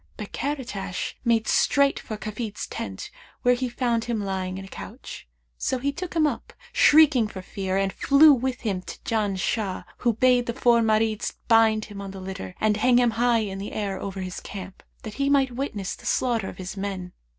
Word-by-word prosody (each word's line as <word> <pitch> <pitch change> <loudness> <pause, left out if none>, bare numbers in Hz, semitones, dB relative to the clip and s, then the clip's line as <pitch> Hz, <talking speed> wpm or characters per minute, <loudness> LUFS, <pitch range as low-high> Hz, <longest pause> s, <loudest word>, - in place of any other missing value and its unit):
But 210 - -7
Karatash 235 -10 -3
made 230 -2 +2
straight 280 -1 +3
for 215 - -6
Kafid's 215 0 -5
tent - - -6 0.3
where 245 - +5
he 250 0 -2
found 235 -2 0
him 235 -2 -1
lying 190 -2 -3
in 195 - -7
a - - -11
couch; - - -9 0.3
so 260 - 0
he 280 +3 -1
took 355 +4 -6
him 320 -2 +4
up, 295 - -3 0.2
shrieking 300 -7 +6
for 190 -3 -8
fear, 190 0 -3
and 195 -1 0
flew 290 +2 +6
with 260 0 -2
him 195 -6 -2
to - - -9
Janshah, 205 -2 -1
who 240 -2 +2
bade 245 +1 +3
the 235 - -1
four 235 -1 +4
Marids 220 -1 +1
bind 225 -1 +4
him 205 -1 -9
on 200 - -6
the 190 0 -8
litter 185 - -7
and 215 -1 +2
hang 245 +3 +4
him 245 -1 +4
high 235 0 +2
in 195 -2 -4
the 200 - -6
air 200 -3 -2
over 195 -1 -5
his 185 -1 -5
camp, 190 -1 -9 0.2
that 215 - -6
he 275 - +2
might 275 -2 +3
witness 240 -7 -3
the - - -10
slaughter 230 -6 +1
of - - -10
his 185 +1 -6
men. 195 -2 -5
220 Hz, 200 wpm, -25 LUFS, 195-245 Hz, 0.3 s, shrieking